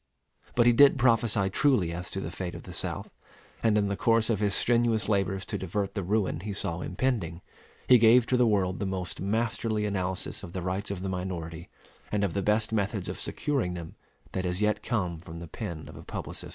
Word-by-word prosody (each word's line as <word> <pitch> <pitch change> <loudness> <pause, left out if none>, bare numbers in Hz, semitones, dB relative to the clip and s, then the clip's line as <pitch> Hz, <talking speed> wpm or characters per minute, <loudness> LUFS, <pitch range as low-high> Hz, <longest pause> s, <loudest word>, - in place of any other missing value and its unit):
But 120 - +4
he 120 - +6
did 140 +3 +7
prophesy 115 -5 +3
truly 105 - +2
as 90 +2 -5
to 95 - -4
the 85 -3 -4
fate 90 -1 -5
of - - -8
the - - -9
South; - - -4 0.5
and 110 -2 +3
in 100 -1 +2
the 100 - -1
course 115 +1 +2
of 105 - 0
his 100 -1 +1
strenuous 115 -2 +2
labors 95 -2 0
to - - -4
divert 95 +2 -2
the 100 - -2
ruin 95 -3 0
he 100 +3 -4
saw 85 -3 -3
impending, 95 -5 -2 0.4
he 125 -1 +8
gave 115 +2 +6
to 125 - +1
the 125 -1 +4
world 95 -3 +1
the 100 - -1
most 95 -1 -4
masterly 110 +1 0
analysis 95 -2 -2
of 85 - -9
the 95 - -3
rights 95 +3 -2
of 95 -2 -4
the 95 - -2
minority 90 -2 -5 0.4
and 105 -1 +1
of 100 - 0
the 100 - 0
best 105 +2 +1
methods 100 -2 0
of - - -5
securing 135 -12 -1
them 85 -2 -7 0.4
that 95 - -2
has 90 0 -1
yet 105 0 +1
come 90 -8 -1
from 80 0 -9
the 85 0 -7
pen 85 -7 -6
of - - -11
a - - -9
publicist. - - -6
100 Hz, 220 wpm, -28 LUFS, 90-110 Hz, 0.5 s, he